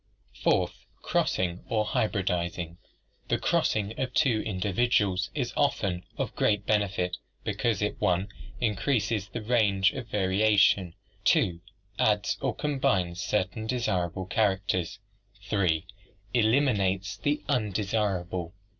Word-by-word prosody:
Fourth, -, -, +1 dB, 0.2 s
crossing 90 Hz, -1 st, 0 dB
or 110 Hz, -3 st, +1 dB
hybridizing. 90 Hz, -5 st, -1 dB, 0.5 s
The -, -, +1 dB
crossing 105 Hz, 0 st, +1 dB
of 130 Hz, -1 st, -2 dB
two 115 Hz, -6 st, +3 dB
individuals 100 Hz, -1 st, +1 dB
is 125 Hz, -5 st, -2 dB
often 100 Hz, -11 st, 0 dB
of -, -, -3 dB
great 105 Hz, -1 st, +1 dB
benefit 100 Hz, -4 st, 0 dB, 0.3 s
because 110 Hz, -4 st, 0 dB
it 105 Hz, -, -1 dB
(i) 90 Hz, +1 st, +2 dB, 0.3 s
increases 110 Hz, -2 st, 0 dB
the 115 Hz, -, -5 dB
range 105 Hz, -5 st, +3 dB
of 130 Hz, -3 st, -6 dB
varia 105 Hz, +1 st, +2 dB
tion, 95 Hz, -3 st, +4 dB, 0.3 s
(2) 85 Hz, -2 st, +3 dB, 0.4 s
adds 105 Hz, -1 st, +2 dB
or 135 Hz, -4 st, -1 dB
combines 130 Hz, -, 0 dB
certain 105 Hz, +2 st, -1 dB
desirable 95 Hz, -7 st, -1 dB
characters, 95 Hz, -4 st, 0 dB, 0.5 s
(3) 95 Hz, -6 st, +1 dB, 0.5 s
elimin 120 Hz, 0 st, +3 dB
ates 95 Hz, 0 st, -1 dB
the 145 Hz, +1 st, -1 dB
undesirable. 100 Hz, -, -1 dB
100 Hz, 110 wpm, -28 LUFS, 95-110 Hz, 0.5 s, tion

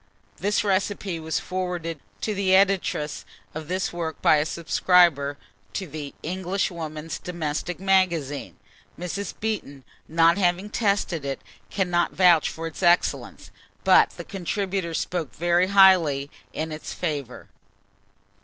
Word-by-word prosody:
[This 205 Hz, +4 st, 0 dB
recipe 195 Hz, -2 st, -1 dB
was 160 Hz, 0 st, -2 dB
forwarded 180 Hz, -3 st, -4 dB, 0.2 s
to 215 Hz, -, -1 dB
the 190 Hz, -2 st, +3 dB
editress 190 Hz, -6 st, +1 dB, 0.3 s
of 155 Hz, -1 st, -6 dB
this 185 Hz, +1 st, -2 dB
work 165 Hz, -3 st, -4 dB
by 155 Hz, -, +5 dB
a 150 Hz, +1 st, 0 dB
subscriber 170 Hz, -4 st, +3 dB, 0.4 s
to 195 Hz, -, -3 dB
the 150 Hz, -3 st, -7 dB
"Englishwoman's 170 Hz, -3 st, -3 dB
Domestic 170 Hz, 0 st, -4 dB
Magazine." 175 Hz, -7 st, 0 dB, 0.4 s
Mrs. 180 Hz, +4 st, -4 dB
Beeton, 200 Hz, -11 st, -4 dB, 0.2 s
not 165 Hz, +3 st, +4 dB
having 185 Hz, +2 st, +1 dB
tested 200 Hz, -, 0 dB
it, 135 Hz, -1 st, -3 dB, 0.3 s
cannot 180 Hz, -3 st, 0 dB
vouch 175 Hz, -4 st, +5 dB
for 165 Hz, -, -6 dB
its 165 Hz, +2 st, -7 dB
excellence; 175 Hz, 0 st, +1 dB, 0.3 s
but -, -, +6 dB
the -, -, -6 dB
contributor 190 Hz, -2 st, -3 dB
spoke 165 Hz, -8 st, -3 dB
very 175 Hz, +2 st, +2 dB
highly 175 Hz, -8 st, +5 dB, 0.2 s
in 160 Hz, +1 st, -4 dB
its 155 Hz, 0 st, -6 dB
favour. 145 Hz, -7 st, -4 dB
175 Hz, 125 wpm, -25 LUFS, 155-190 Hz, 0.4 s, but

